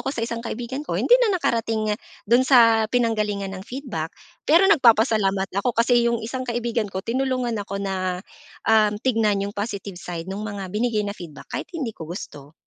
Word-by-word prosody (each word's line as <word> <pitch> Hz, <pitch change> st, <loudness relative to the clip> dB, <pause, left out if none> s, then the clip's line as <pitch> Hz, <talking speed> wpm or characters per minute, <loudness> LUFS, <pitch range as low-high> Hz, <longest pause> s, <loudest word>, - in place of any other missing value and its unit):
ko -, -, -4 dB
sa 235 Hz, -4 st, -2 dB
isang 230 Hz, -1 st, -4 dB
kaibigan 245 Hz, +3 st, -5 dB
ko, 300 Hz, -, -3 dB
hindi -, -, +1 dB
na 420 Hz, -6 st, +3 dB
nakarating 225 Hz, -7 st, 0 dB, 0.3 s
doon 235 Hz, +4 st, +4 dB
sa 230 Hz, -4 st, +5 dB
pinanggalingan 210 Hz, -5 st, 0 dB
ng 185 Hz, -, -6 dB
feedback. 235 Hz, -, -5 dB, 0.3 s
Pero 335 Hz, +5 st, +6 dB
nagpapasalamat 220 Hz, -, +3 dB
ako 245 Hz, +2 st, -1 dB
kasi 235 Hz, 0 st, +4 dB
yung 235 Hz, -, +1 dB
isang 255 Hz, +3 st, -4 dB
kaibigan 235 Hz, -2 st, -1 dB
ko 190 Hz, -1 st, -5 dB
tinulungan 255 Hz, 0 st, -1 dB
ako 200 Hz, 0 st, -5 dB
na, 185 Hz, -2 st, -3 dB, 0.4 s
um, 215 Hz, -2 st, +4 dB
tignan 215 Hz, -4 st, +1 dB
yung 200 Hz, -, -5 dB
positive 200 Hz, -3 st, -5 dB
side 170 Hz, -2 st, -6 dB
'nong 195 Hz, +2 st, -5 dB
mga 205 Hz, -3 st, -5 dB
binigay 215 Hz, -1 st, 0 dB
na 200 Hz, -, -3 dB
feedback 170 Hz, -7 st, -11 dB
kahit -, -, -4 dB
hindi 265 Hz, -8 st, -3 dB
ko 160 Hz, -5 st, -9 dB
gusto. 145 Hz, -5 st, -8 dB
220 Hz, 180 wpm, -23 LUFS, 200-240 Hz, 0.4 s, Pero